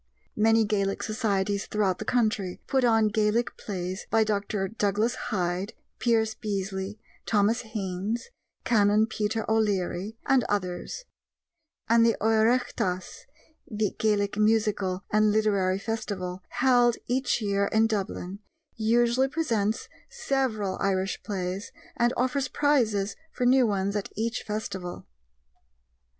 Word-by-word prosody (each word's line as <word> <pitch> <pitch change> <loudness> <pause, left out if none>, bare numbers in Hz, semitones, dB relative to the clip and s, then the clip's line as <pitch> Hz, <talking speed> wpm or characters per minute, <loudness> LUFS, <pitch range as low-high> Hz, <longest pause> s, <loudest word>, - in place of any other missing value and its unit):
Many 225 +1 +4
Gaelic 200 -2 -1
societies 200 -2 -1
throughout 200 -4 0
the - - -5
country 215 -6 0
put 265 -1 +1
on 225 -3 +4
Gaelic 215 +3 +1
plays 185 -1 -5
by 225 0 +4
Dr. 205 -2 -1
Douglas 210 +2 0 0.2
Hyde, 185 0 -1 0.3
Pierce 225 -2 +2
Beasley, 195 -1 -4 0.3
Thomas 215 +3 +2
Haynes, 215 - -4 0.3
Canon 210 -1 +4
Peter 220 0 -2
O'Leary, 210 -1 0
and 265 -3 +4
others; 200 - -3 0.8
and 230 0 +5
the 230 -1 +3
Oireachtas 220 -4 +1 0.4
(the 215 -2 -1
Gaelic 205 -1 +1
musical 210 -3 +1
and 215 0 +4
literary 200 -3 +2
festival) 195 -4 -4
held 245 -2 +3
each 255 +1 0
year 200 -2 +1
in 220 0 +3
Dublin 200 -3 -3 0.4
usually 235 +3 +3
presents 230 -9 -1 0.2
several 260 - -1
Irish 190 0 0
plays 190 -1 -4 0.2
and 240 0 +2
offers 260 +2 0
prizes 220 -10 +1 0.2
for 250 - -2
new 255 0 +5
ones 200 -1 -1
at 205 - -2
each 230 +2 -2
festival. 200 -4 -5
215 Hz, 115 wpm, -27 LUFS, 195-230 Hz, 0.8 s, and